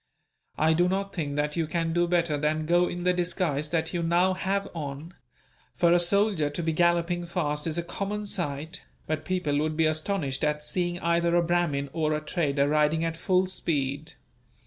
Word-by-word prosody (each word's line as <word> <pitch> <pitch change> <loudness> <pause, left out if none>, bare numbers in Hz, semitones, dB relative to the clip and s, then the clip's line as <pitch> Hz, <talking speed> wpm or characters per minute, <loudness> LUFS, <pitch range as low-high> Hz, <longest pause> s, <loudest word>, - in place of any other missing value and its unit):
I 160 +1 +3
do 175 +2 +3
not 195 +1 -2
think 145 -6 -3
that 150 0 -1
you 165 -2 0
can 165 0 -1
do 175 0 +2
better 170 -3 +1
than 155 +1 0
go 175 +2 +3
in 175 0 -5
the 180 0 +3
disguise 170 -4 -1
that 160 0 -1
you 175 - -1
now 175 +3 +2
have 195 +1 -1
on; 150 +1 -6 0.6
for 170 -1 +4
a 175 - +5
soldier 190 -3 +2
to 160 +4 -4
be 160 0 0
galloping 175 +1 +2
fast 150 -3 -2
is 160 0 -1
a 170 - -1
common 205 +4 -4
sight, 160 -3 -3 0.2
but 155 0 -3
people 155 -6 0
would 155 0 -1
be 160 - +3
astonished 155 -3 -1
at 150 0 0
seeing 175 +2 0
either 170 0 +2
a 175 - +4
Brahmin 165 -5 0
or 155 -2 0
a - - -1
trader 150 -3 0
riding 155 +2 +2
at 165 0 -2
full 185 +2 +2
speed. 150 -3 -2
165 Hz, 190 wpm, -27 LUFS, 150-175 Hz, 0.6 s, a